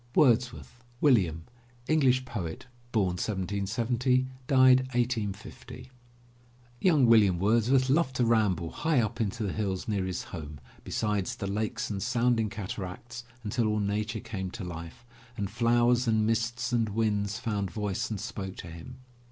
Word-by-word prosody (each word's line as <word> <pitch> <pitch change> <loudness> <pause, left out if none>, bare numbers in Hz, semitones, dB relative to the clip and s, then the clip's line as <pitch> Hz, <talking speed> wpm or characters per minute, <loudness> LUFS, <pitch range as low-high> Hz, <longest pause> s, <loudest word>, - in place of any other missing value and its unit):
WORDSWORTH, 120 -2 +2 0.2
WILLIAM 95 - +3 0.4
(English 130 -5 +3
poet, 90 -9 -5 0.3
1770 105 +6 0 0.3
1850) 125 -2 +1 0.9
Young 155 -8 +4
William 105 -6 +5
Wordsworth 115 +7 +3
loved 135 -1 +2
to 125 - +2
ramble 105 -8 +1
high 160 -4 +1
up 115 +1 -1
into 110 +2 -2
the 100 - -2
hills 100 0 -2
near 100 -4 0
his 90 -2 -3
home, 75 -3 -8 0.2
beside 105 -3 -1
the - - -4
lakes 105 +2 -2
and 100 -2 -3
sounding 120 -2 +1
cataracts, 105 +4 -6 0.2
until 115 +1 0
all 105 0 0
Nature 105 +2 -2
came 95 -3 -5
to 105 +2 -7
life, 85 +5 -8 0.3
and 100 -1 -3
flowers 120 +2 +3
and 110 -1 +2
mists 120 +3 -1
and 115 -2 +2
winds 105 -1 0
found 105 -4 -2
voice 105 -1 -3
and 105 -3 -3
spoke 95 -3 -5
to 85 - -9
him. 85 +10 -10
110 Hz, 135 wpm, -29 LUFS, 100-120 Hz, 0.9 s, William